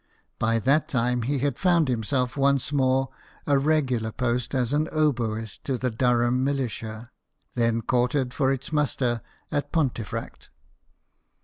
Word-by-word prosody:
By 115 +1 +2
that 140 +7 +2
time, 125 -3 +1
he 140 +5 -1
had 140 -1 -1
found 175 -4 +3
himself 125 +1 0
once 140 0 +2
more 135 -1 +2 0.4
a 140 -1 +3
regular 135 -7 +1
post 125 +2 -1
as 125 0 0
oboist 125 -8 0
to 135 -2 -1
the 125 0 -1
Durham 120 +1 +2
militia, 120 -4 -3 0.4
then 115 -1 +1
quartered 125 +2 +1
for 135 -2 +2
its 135 +4 -4
muster 130 -5 0 0.3
at 145 -1 -2
Pontefract. 130 -9 -3
130 Hz, 130 wpm, -25 LUFS, 120-140 Hz, 0.4 s, found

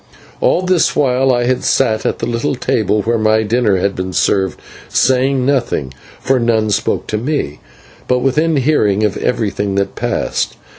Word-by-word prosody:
All 180 - +2
this 185 -2 +2
while 135 -2 +2
I 120 -1 +1
sat 110 -5 +1
at - - -1
the - - -3
little 120 +4 -1
table 105 -4 0
where 115 0 0
my 110 0 +2
dinner 110 -2 +1
had 95 +2 -1
been 95 0 -4
served, 95 0 0 0.3
saying 130 0 +2
nothing, 120 - -1 0.3
for 135 -1 +1
none 110 -2 +1
spoke 100 - -1
to 105 - -3
me, 125 - -3 0.5
but 125 - +2
within 150 +6 +1
hearing 110 -8 +2
of 105 - 0
everything 100 -4 -1
that 100 0 -1
passed. - - -2
115 Hz, 160 wpm, -16 LUFS, 105-135 Hz, 0.5 s, All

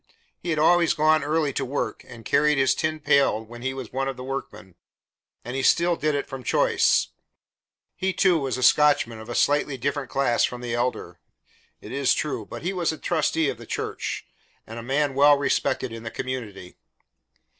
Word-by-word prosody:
He 175 - -6
had 155 - 0
always 170 +2 +4
gone 155 0 +3
early 150 -1 0
to 135 - -2
work, 125 -3 -3
and 115 -3 -12
carried 150 +1 +3
his 135 -1 +3
tin 155 0 -2
pail 140 -7 +2
when 120 +2 -11
he 130 +1 -2
was 130 -4 -8
one 135 +1 -1
of 135 -2 -4
the 125 - -7
workmen, 110 -8 -6 0.7
and 125 - -5
he 135 - -1
still 170 +5 +3
did 155 -2 0
it 145 - -2
from 135 -2 -8
choice. - - +2 0.9
He, 190 0 -1
too, 180 -3 +3
was 135 -3 -2
a 130 - -3
Scotchman 145 -5 +4
of 110 +1 -11
a 120 - -4
slightly 145 -1 +1
different 140 +2 -3
class 135 -3 +1
from 125 0 -2
the 120 -1 -4
Elder, 120 +1 -2 0.6
it - - -10
is 135 0 +2
true, 150 - -3
but - - -8
he 185 +3 -1
was 175 -3 0
a 160 - -7
trustee 160 -1 0
of - - -5
the - - -11
church, - - -4 0.4
and 115 +1 -8
a - - -6
man 135 +4 0
well 145 +1 +6
respected 135 -2 0
in 115 0 -7
the 115 - -6
community. 110 -9 -6
135 Hz, 200 wpm, -24 LUFS, 125-150 Hz, 0.9 s, well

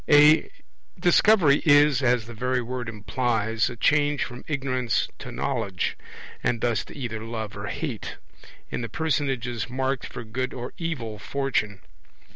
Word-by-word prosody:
A 150 +1 +7 0.5
Discovery 175 -5 +5
is, 145 -3 +5
as 120 -3 +2
the 120 - -9
very 125 +3 0
word 125 -1 -4
implies, 115 0 0
a 120 - -7
change 145 +4 +2
from 125 -1 -8
ignorance 130 -5 0
to - - -7
knowledge, 110 -10 -2 0.5
and 120 - +1
thus 115 -2 0
to - - -12
either 115 -5 -4
love 110 -2 -5
or - - -5
hate, - - -4 0.6
in - - -2
the 115 - -4
personages 135 -7 -1
marked 130 +1 -1
for - - -7
good 130 +3 -3
or 125 0 -6
evil 125 -11 -3
fortune. 105 -3 -1
125 Hz, 145 wpm, -25 LUFS, 115-140 Hz, 0.6 s, A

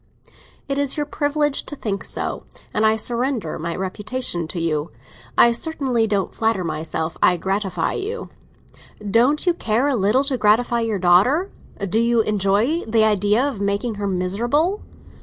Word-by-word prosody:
"It 275 0 -1
is 285 +1 -1
your 295 - 0
privilege 290 0 0
to 290 - -5
think 205 -7 -3
so, - - -4 0.3
and 215 +1 +3
I 220 - +3
surrender 235 - -2
my 165 +1 -3
reputation 190 -1 -3
to 170 - -5
you! 155 -2 -1 0.5
I 235 - +7
certainly 250 -3 -1
don't 200 -3 -1
flatter 225 -4 0
myself 160 0 -3
I 180 - +4
gratify 195 +2 -1
you." 445 +5 -4 0.8
"Don't 255 - +3
you 350 - +4
care 235 -4 0
a 285 - +1
little 215 +5 +2
to 275 -3 -1
gratify 235 +3 +3
your 225 -3 -1
daughter? 200 - +3 0.4
Do 215 +5 +1
you 235 0 +3
enjoy 215 - +1
the 220 0 +3
idea 210 +2 +3
of 245 -8 -4
making 200 +4 -1
her 200 - -1
miserable?" 235 - 0
225 Hz, 160 wpm, -21 LUFS, 195-270 Hz, 0.8 s, I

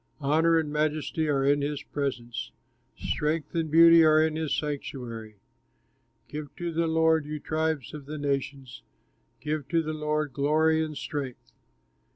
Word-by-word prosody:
Honor 160 +3 +3
and 150 -2 -1
majesty 155 +1 0
are 135 -2 +1
in 145 +1 +3
his 145 0 -3
presence, 120 -5 -4 0.5
Strength 150 +1 -2
and 165 -2 -1
beauty 165 +1 +8
are 155 0 +6
in 155 0 +2
his 160 -2 -2
sanctuary. 125 -7 -5 0.9
Give 150 -1 -6
to 175 -2 -4
the 165 +1 +1
Lord, 160 -1 +2
you 150 0 -4
tribes 155 -3 -2
of 145 -2 -9
the 155 +1 -5
nations, 140 -2 -3 0.6
Give 150 -1 -3
to 165 +1 +1
the 155 0 -3
Lord 150 -2 -2
glory 160 +3 +2
and 155 -2 -5
strength. 135 -4 -5
150 Hz, 150 wpm, -27 LUFS, 140-160 Hz, 0.9 s, beauty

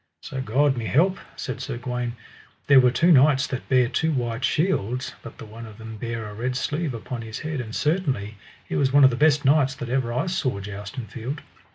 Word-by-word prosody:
So 130 - -5
God 135 +3 +2
me 115 -2 -3
help, 185 +7 +2 0.2
said - - -5
Sir 135 -5 -4
Gawaine, 125 -1 -3 0.5
there 140 -2 +7
were 125 -1 +5
two 165 +8 +3
knights 140 -1 +5
that 130 - -5
bare 130 -2 +4
two 160 +6 0
white 120 -3 -2
shields, 125 - 0
but 115 - -11
the - - -9
one 115 +2 -10
of 105 -2 -12
them 110 -1 -8
bare 115 0 -4
a 105 - -8
red 125 +4 -3
sleeve 145 0 -2
upon 115 +1 -6
his 110 -1 -6
head, 155 -4 -3
and 110 -2 -7
certainly 135 - -1 0.3
he - - -3
was 135 -2 +2
one 140 +1 +6
of 130 - +7
the - - -1
best 150 +1 +3
knights 135 -1 +4
that 125 -2 -6
ever 125 -2 0
I 125 +6 0
saw 140 - -1
joust 100 +3 -8
in 125 - -4
field. 125 +6 -6
125 Hz, 225 wpm, -24 LUFS, 115-145 Hz, 0.5 s, there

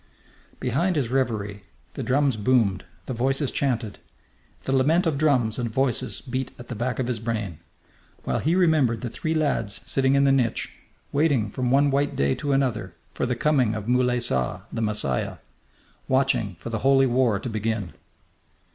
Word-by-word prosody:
Behind 170 +9 0
his 135 -6 0
reverie 105 -6 -1 0.3
the - - -5
drums 135 0 +2
boomed, 105 -4 +2 0.2
the 130 - -4
voices 135 +3 0
chanted. 120 -6 -1 0.6
The - - -2
lament 160 +8 +3
of 160 -3 +1
drums 130 -6 +2
and 120 -1 -1
voices 130 +1 -1
beat 130 0 -3
at 120 - -12
the 125 - -4
back 125 +3 -2
of 130 - -1
his 120 -2 -2
brain 110 -7 -3 0.6
while - - -1
he 160 +4 +1
remembered 155 -11 +3
the 120 - -4
three 155 +7 -2
lads 140 -9 0
sitting 135 +1 +2
in 140 - +4
the 140 - +4
niche, 125 -4 0 0.4
waiting 140 -8 +2
from 125 +2 -1
one 140 +2 +4
white 140 +1 0
day 70 0 +2
to 145 - -3
another 110 -10 0 0.2
for - - -1
the 125 - 0
coming 130 -5 +2
of 105 0 -5
Moulay 125 0 +2
Saa, 65 - 0
the 115 - -2
Messiah; 105 - -1 0.7
watching 130 -7 +1
for 115 - -7
the 110 - -1
Holy 135 +2 +4
War 120 -5 +2
to - - -6
begin. 110 -6 -2
125 Hz, 175 wpm, -25 LUFS, 110-135 Hz, 0.7 s, in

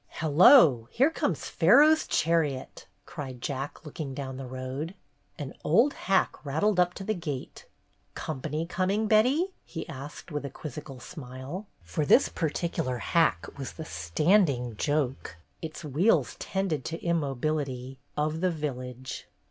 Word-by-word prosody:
"Hello! 155 - +6
Here 275 +6 +3
comes - - -1
Pharaoh's 310 +2 +5
chariot!" 155 -5 0 0.2
cried 135 -7 -7
Jack, 140 +5 -5
looking 145 -2 -6
down 130 -2 -5
the 135 -1 -6
road. 130 +7 -5 0.4
An 145 -4 -6
old 230 - +4
hack 195 -1 0
rattled 165 +8 +1
up 180 0 +3
to 195 - -6
the 215 - 0
gate. 155 -8 -6 0.5
"Company 155 +2 -3
com 185 +2 -1
ing, 210 +3 +1
Betty? 255 - +3
" - - -42
he 165 - -7
asked, 150 +2 -9
with 150 -1 -3
a 140 - -4
quizzical 145 -1 -8
smile, 135 - -8 0.2
for 85 - -2
this 145 - +5
particular 155 -5 -2
hack 115 - +2
was 135 - -5
the 160 - -7
"standing" 125 - +2
joke 135 - -1
— - - -41
its 160 0 -7
wheels 150 - +2
tended 190 -8 -2
to 165 +1 -4
immobility 140 -4 -1
— - - -40
of 155 +1 -4
the 185 - +3
village. 130 -5 -5
150 Hz, 150 wpm, -28 LUFS, 130-175 Hz, 0.5 s, Hello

